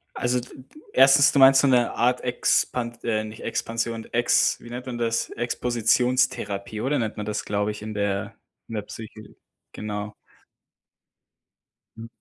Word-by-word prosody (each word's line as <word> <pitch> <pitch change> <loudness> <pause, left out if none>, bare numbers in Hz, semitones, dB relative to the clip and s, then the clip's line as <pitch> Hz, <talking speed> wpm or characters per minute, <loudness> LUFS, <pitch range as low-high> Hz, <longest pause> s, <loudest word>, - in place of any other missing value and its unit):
Also, 125 +1 0
d 125 - -10 0.5
1. 135 +1 +6
du 140 - +1
meinst 135 0 +8
so 140 - +3
'ne 125 -2 +3
Art, 125 +1 +1
Expan 120 -1 0
äh, 110 -2 0
nicht 110 0 -9
Expansion, 115 0 -3
Ex 120 +1 +2
wie 120 - -12
nennt 125 +2 -7
man 120 -2 -5
das, 115 0 -1
Expositionstherapie 120 -3 0
oder 140 +1 0
nennt 110 -2 -3
man 105 - -4
das, 105 0 -3
glaube 105 0 -1
ich, 105 - -9
in 110 0 -6
der 100 -1 -2 0.3
in 115 - -7
der 105 - -3
Psyche, 110 0 -11 0.4
genau? 105 0 -5 1.8
Mhm. 115 - -8
115 Hz, 150 wpm, -24 LUFS, 105-125 Hz, 1.8 s, meinst